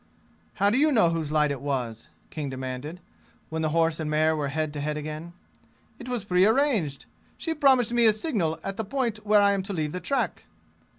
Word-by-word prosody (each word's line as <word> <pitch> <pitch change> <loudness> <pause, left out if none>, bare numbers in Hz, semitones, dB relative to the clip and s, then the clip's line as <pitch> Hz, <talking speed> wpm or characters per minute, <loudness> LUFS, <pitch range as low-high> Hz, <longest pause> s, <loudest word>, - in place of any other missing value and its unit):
"How 200 +1 +2
do 250 - +2
you 305 +1 +4
know 215 -10 +4
whose 160 -3 -2
light 150 -1 +2
it 140 - -4
was?" 125 -6 -3 0.2
King 150 -3 -4
demanded, 130 +6 -6 0.5
when 160 0 -3
the 155 - +1
horse 165 0 +1
and 155 -1 -3
mare 155 +1 +2
were 150 -2 -2
head 155 +1 -2
to 145 - -5
head 150 +1 -2
again. 155 +3 -6 0.7
"It 250 - -8
was 245 -5 -2
prearranged. 200 - +2 0.3
She 325 - -2
promised 265 -6 +3
me 235 -1 +5
a 215 - +5
signal 210 - -1
at 195 0 -4
the 220 - -2
point 230 -2 -2
where 210 -1 +4
I 200 - +5
am 200 -1 0
to 195 +2 -5
leave 155 -4 -2
the 180 - -4
track!" 275 +8 -2
165 Hz, 205 wpm, -26 LUFS, 150-220 Hz, 0.7 s, me